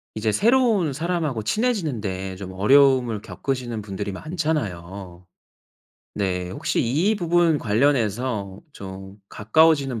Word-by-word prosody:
이제 110 0 0
새로운 225 - +3
사람하고 155 -5 -2
친해지는 190 - -1
데 95 -1 -4
좀 95 -1 -8
어려움을 125 +2 +4
겪으시는 125 -2 -4
분들이 100 0 -5
많잖아요. 95 - -4 0.9
네 90 -3 -2
혹시 - - -1
이 160 - +1
부분 175 -4 +2
관련해서 110 -4 0
좀 95 -3 -9
가까워지는 140 +1 +2
120 Hz, 275 characters per minute, -23 LUFS, 100-160 Hz, 0.9 s, 어려움을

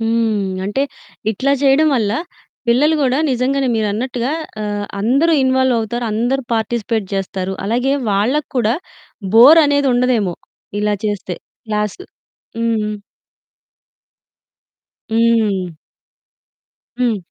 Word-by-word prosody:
హ్మ్. 220 -4 0
అంటే 210 +7 -1 0.5
ఇట్లా 265 +6 0
చేయడం 280 +3 +4
వల్ల 215 -3 0 0.6
పిల్లలు 290 +7 +4
గూడా 265 0 +2
నిజంగానే 260 +1 0
మీరన్నట్టుగా 235 +4 -1 0.3
ఆహ్, 205 -1 -3
అందరూ 275 +10 +3
ఇన్వాల్వ్ 260 -1 +2
అవుతారు, 235 +2 -3
అందరూ 245 +5 0
పార్టిసిపేట్ 225 -2 -1
జేస్తారు. 190 -1 -3
అలాగే 245 +5 +1 0.2
వాళ్ళకూడా 235 +2 +1 0.6
బోర్ 280 +8 +9
అనేది 285 -1 +2
ఉండదేమో 240 -8 +1 0.5
ఇలా 210 0 +1
చేస్తే 195 -4 -3 0.3
క్లాసు. 210 - -2 0.5
హ్మ్. 220 -2 -1 2.2
హ్మ్. 215 -7 +1 1.2
హ్మ్. 240 -3 +2
230 Hz, 95 wpm, -18 LUFS, 210-260 Hz, 2.2 s, బోర్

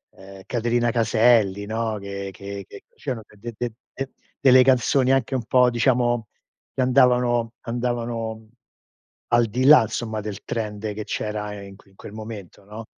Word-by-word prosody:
ehm 95 0 -13
Caterina 120 0 0
Caselli, 110 -3 +3
no, 110 0 -2
che 100 0 -6
che 100 +1 -8
che - - -12
c'erano 120 -4 -5
de 115 +3 -9
de 120 -1 -2
de - - -23 0.2
de 135 0 -5 0.3
delle 130 -1 +7
canzoni 130 +1 +3
anche 135 0 +1
un 125 - -1
po' 125 +2 +4
diciamo 120 -1 +1 0.5
che - - -1
andavano 125 -2 +3
andavano 115 -2 -3 0.8
al 120 -1 +4
di 125 +5 -1
là, 150 -4 +8
insomma, 110 0 -4
del 105 -1 -7
trend 105 -1 -4
che 105 +1 -5
c'era 105 -1 -4
in 100 0 -11
que 100 - -22
in 95 - -26
quel - - -11
momento, 110 -4 -9
no, 110 +2 -9
115 Hz, 160 wpm, -23 LUFS, 105-120 Hz, 0.8 s, là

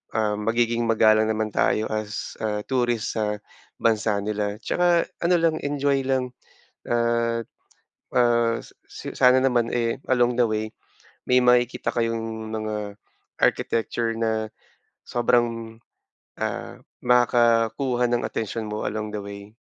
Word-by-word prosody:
um, 105 -1 0
magiging 115 0 +1
magalang 110 -1 +4
naman 110 0 -1
tayo 110 - +2
as, 110 -1 -4
ah, 105 -1 -1
tourist 120 -4 0
sa 105 -1 -1 0.4
bansa 110 -2 +2
nila. 105 -1 -2
Tsaka 175 -1 +2 0.2
ano 175 +1 +4
lang, 165 -1 +2
enjoy 140 -1 0
lang 130 -1 0 0.6
at, 115 -1 +1 0.7
ah, 120 -1 +3
s - - -15 0.2
s - - -8
sana 125 +1 +6
naman, 120 -3 +2
eh, 115 0 0
along 120 -1 +2
the 120 - +5
way, 110 0 -2 0.6
may 125 0 +5
makikita 125 0 +3
kayong 115 -1 -2
mga 105 -2 -4 0.4
architecture 115 0 +1
na 110 -1 -1 0.6
sobrang, 115 -2 0 0.6
ah, - - -4 0.2
makakuha 120 +1 +3
ng 120 - +1
atensyon 110 0 -4
mo 105 0 -4
along 110 0 -3
the 105 - -3
way. 100 +1 -9
115 Hz, 125 wpm, -24 LUFS, 110-120 Hz, 0.7 s, sana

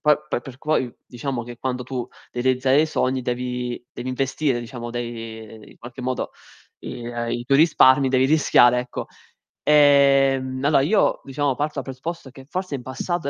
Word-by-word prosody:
poi 150 -1 +5
per - - -1
perc 130 +1 -11
poi 140 -5 0
diciamo 125 -1 -4
che 120 0 -9
quando 125 0 -3
tu 130 -1 -4 0.3
devi 120 - -3
realizzare 130 +2 +3
i 160 - +2
sogni 130 -4 -1
devi 125 0 -3
devi 120 +1 -6
investire, 130 +1 0
diciamo, 120 0 -7
dei 115 -2 -5
ehm, 110 0 -13
in - - -18
qualche 120 +2 -10
modo 130 0 -3 0.5
i 120 - -7
ehm, 120 -1 -3
i 120 0 -3
tuoi 135 +2 +3
risparmi, 140 -4 +5
devi 130 0 +3
rischiare, 125 -4 +4
ecco. 125 0 -6 0.6
Ehm, 135 -3 +4
allora 145 -2 +4
io, 195 +9 +2
diciamo, 140 0 -1
parto 150 +2 -2
dal 135 - -3
presupposto 135 +4 -6
che 135 +1 -13
forse 185 -5 -3
in 130 - -6
passato 140 +5 -3
130 Hz, 180 wpm, -22 LUFS, 120-140 Hz, 0.6 s, poi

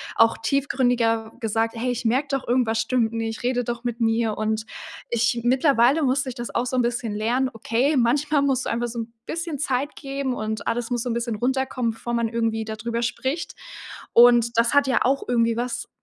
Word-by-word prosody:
auch 225 0 +4
tiefgründiger 240 -3 0
gesagt: 225 +1 0
„Hey, 250 +2 -1
ich 240 -1 -4
merke 265 +5 +1
doch 275 -1 -2
irgendwas 235 -2 +1
stimmt 235 -3 +1
nicht, 225 0 -4
rede 245 -1 0
doch 240 0 -4
mit 240 -1 -3
mir“ 225 -1 +1
und 215 0 -1 0.4
ich 235 0 +1
mittlerweile 260 +2 +3
musste 265 0 +1
ich 245 - -7
das 240 0 -6
auch 240 - +1
so 255 +1 -2
'n - - +4
bisschen 235 -2 -2
lernen, 240 +5 0
okay, 245 +6 0
manchmal 285 +5 +2
musst 270 -3 +1
du - - -2
einfach 240 +1 -1
so 235 0 -6
'n 230 0 -5
bisschen 330 -4 -4
Zeit 275 +1 -1
geben 275 -2 -3
und 215 -2 -4
alles 235 +1 -2
muss 240 -1 0
so 250 - -3
'n - - 0
bisschen 235 -1 -2
runterkommen, 255 0 -1
bevor 235 +2 -6
man 235 -1 0
irgendwie 225 -1 -1
dadrüber 225 +2 -4
spricht. 260 +6 -2 0.6
Und 235 -1 +6
das 235 +3 +3
hat 285 -1 +4
ja 260 - +2
auch 270 +2 +1
irgendwie 230 -1 +2
was 245 0 -3
240 Hz, 200 wpm, -23 LUFS, 230-260 Hz, 0.6 s, Und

